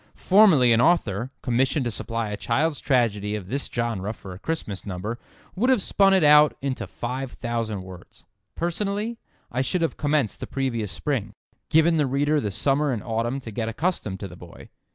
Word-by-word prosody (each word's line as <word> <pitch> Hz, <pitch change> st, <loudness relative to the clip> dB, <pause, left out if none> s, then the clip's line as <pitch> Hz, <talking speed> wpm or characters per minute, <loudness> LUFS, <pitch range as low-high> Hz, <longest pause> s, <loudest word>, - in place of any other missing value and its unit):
Formerly 180 Hz, -, +5 dB
an 115 Hz, -, +4 dB
author, 125 Hz, -, +2 dB
commissioned 130 Hz, +2 st, +1 dB
to 120 Hz, -, -1 dB
supply 115 Hz, 0 st, -3 dB
a -, -, -2 dB
child's 145 Hz, +8 st, 0 dB
tragedy 105 Hz, -6 st, +1 dB
of 95 Hz, -3 st, -7 dB
this 140 Hz, +4 st, -2 dB
genre 115 Hz, -4 st, -2 dB
for 95 Hz, -4 st, -10 dB
a 90 Hz, -, -11 dB
Christmas 105 Hz, -9 st, -4 dB
number, 100 Hz, +5 st, -5 dB, 0.4 s
would 235 Hz, +7 st, +1 dB
have 260 Hz, -3 st, +4 dB
spun 195 Hz, 0 st, +3 dB
it 190 Hz, -3 st, +4 dB
out 150 Hz, 0 st, +6 dB
into 135 Hz, -1 st, -3 dB
five 125 Hz, +2 st, -5 dB
thousand 115 Hz, -5 st, -3 dB
words. 95 Hz, -1 st, -13 dB, 0.3 s
Personally, 205 Hz, +6 st, -2 dB, 0.3 s
I 125 Hz, -, 0 dB
should 165 Hz, +6 st, 0 dB
have 165 Hz, -, -1 dB
commenced 145 Hz, -6 st, 0 dB
the -, -, -6 dB
previous 120 Hz, -7 st, -2 dB
spring—given 140 Hz, -, 0 dB
the 150 Hz, -3 st, +2 dB
reader 145 Hz, +3 st, +1 dB
the 105 Hz, -, -2 dB
summer 140 Hz, +8 st, +1 dB
and 115 Hz, -5 st, -3 dB
autumn 115 Hz, +3 st, -2 dB
to 115 Hz, -, -8 dB
get 110 Hz, +1 st, -2 dB
accustomed 115 Hz, -, -2 dB
to 100 Hz, -, -4 dB
the 90 Hz, -, -12 dB
boy. 85 Hz, -1 st, -13 dB
125 Hz, 180 wpm, -24 LUFS, 110-150 Hz, 0.4 s, out